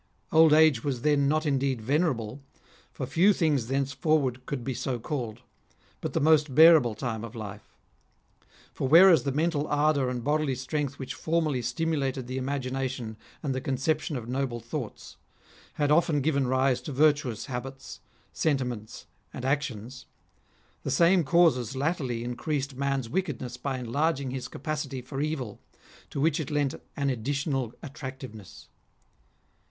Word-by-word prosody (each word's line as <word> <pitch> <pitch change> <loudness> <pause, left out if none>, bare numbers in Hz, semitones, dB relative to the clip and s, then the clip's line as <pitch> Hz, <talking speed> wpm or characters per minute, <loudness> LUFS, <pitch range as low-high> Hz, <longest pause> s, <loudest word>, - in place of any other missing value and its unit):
Old 160 0 +6
age 155 -6 +5
was 130 -4 -2
then 145 -2 +3
not 155 +2 +1
indeed 135 -3 +1
venerable, 130 -1 -1 0.5
for - - -5
few 190 +5 +4
things 150 -10 +1
thence 135 +1 0
forward 135 -4 0
could 140 -4 -3
be 130 - -2
so 125 +1 -2
called, 120 -3 -5 0.6
but - - -4
the - - +1
most 150 -3 +3
bearable 155 -8 +7
time 110 -1 -4
of 115 +1 -8
life. 105 -2 -9 1.0
For 135 - -2
whereas 165 -1 +7
the 140 - +1
mental 150 +1 0
ardour 145 -3 +2
and 125 -2 -4
bodily 150 -1 +1
strength 140 +2 -3
which 130 -1 -5
formerly 155 -5 0
stimulated 135 0 -1
the 130 +2 -4
imagination 130 -3 -3 0.3
and 140 -3 -1
the 130 - -3
con 135 - -1
ception 145 +2 -1
of 115 -2 -7
noble 130 -1 -2
thoughts, 115 -1 -7 0.6
had 145 0 0
often 155 -2 +3
given 140 -2 +1
rise 130 0 +2
to 145 - -6
virtuous 140 -5 +2
habits, 135 +1 -7 0.3
sentiments, 125 -8 -2 0.3
and 125 - -7
actions; 130 -3 -3 0.7
the - - -4
same 170 +6 +4
causes 145 -7 +3
latterly 130 -5 -1
increased 135 +3 -3
man's 135 -2 -1
wickedness 125 -5 -3
by 135 +1 -3
enlarging 135 +3 -1
his 130 -1 -4
capacity 145 -2 -4
for 135 +2 -5
evil, 145 -8 -3 0.5
to - - -5
which 155 +2 +2
it 155 - -3
lent 145 -3 0 0.2
an 140 -1 +1
additional 135 0 -2
attractiveness. 130 - -9
135 Hz, 145 wpm, -27 LUFS, 125-150 Hz, 1.0 s, bearable